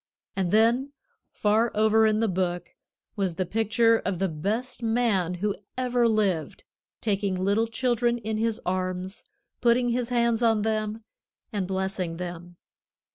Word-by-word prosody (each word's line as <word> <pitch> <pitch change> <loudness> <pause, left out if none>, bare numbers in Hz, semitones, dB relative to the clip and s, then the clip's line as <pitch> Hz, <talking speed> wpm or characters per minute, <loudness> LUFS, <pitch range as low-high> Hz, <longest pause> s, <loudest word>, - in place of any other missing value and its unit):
And 190 -3 0
then 235 +7 +3 0.4
far 220 +3 +2
over 220 +1 +4
in 215 0 +1
the 225 - +2
book 180 -2 -2 0.4
was 190 -5 -1
the 185 - -1
picture 225 +3 +3
of 190 -1 -2
the 195 +2 0
best 215 +11 -3
Man 225 -7 +1
who 200 +3 -1 0.2
ever 245 -2 +2
lived, 200 -8 0 0.4
taking 200 -3 0
little 200 +5 +1
children 240 0 +1
in 220 -1 -3
His 225 0 0
arms, 185 +1 -3 0.4
putting 245 +1 +3
His 240 0 -1
hands 235 -1 +1
on 225 -3 +3
them 215 0 -2 0.5
and 195 -3 -1
blessing 190 -3 -2
them. 175 0 -7
215 Hz, 140 wpm, -26 LUFS, 185-230 Hz, 0.5 s, over